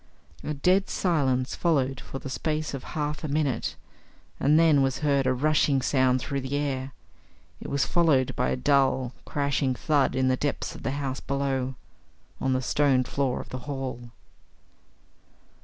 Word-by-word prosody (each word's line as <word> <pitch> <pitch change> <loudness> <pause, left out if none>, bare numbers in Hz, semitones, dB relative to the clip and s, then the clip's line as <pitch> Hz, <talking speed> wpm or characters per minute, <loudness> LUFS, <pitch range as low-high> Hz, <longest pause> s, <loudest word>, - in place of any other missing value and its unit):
A 150 - -3
dead 185 +7 +2
silence 135 -8 +1
followed 135 -6 +1
for - - -7
the 135 - -8
space 155 +3 -2
of 135 - -5
half 150 0 -2
a - - -2
minute, 145 -5 -1 0.6
and 150 +3 +4
then 160 -4 +5
was 135 +1 0
heard 140 -2 +2
a 130 - +3
rushing 145 0 +2
sound 130 -1 +2
through 140 +1 -3
the 130 +2 -3
air. 135 -2 -2 0.7
It - - -6
was 140 -1 +1
followed 155 -7 +2
by 125 - 0
a - - +1
dull, 130 -1 +2
crashing 140 -2 0
thud 140 -1 +1
in 130 0 +2
the 130 - +3
depths 145 +1 -2
of - - -10
the 135 - -2
house 135 -2 -3
below 135 -2 -2 0.6
on 130 0 0
the 130 0 0
stone 135 -1 +3
floor 130 0 -1
of - - -12
the 130 - -5
hall. 130 -3 -5
135 Hz, 165 wpm, -26 LUFS, 130-145 Hz, 0.7 s, then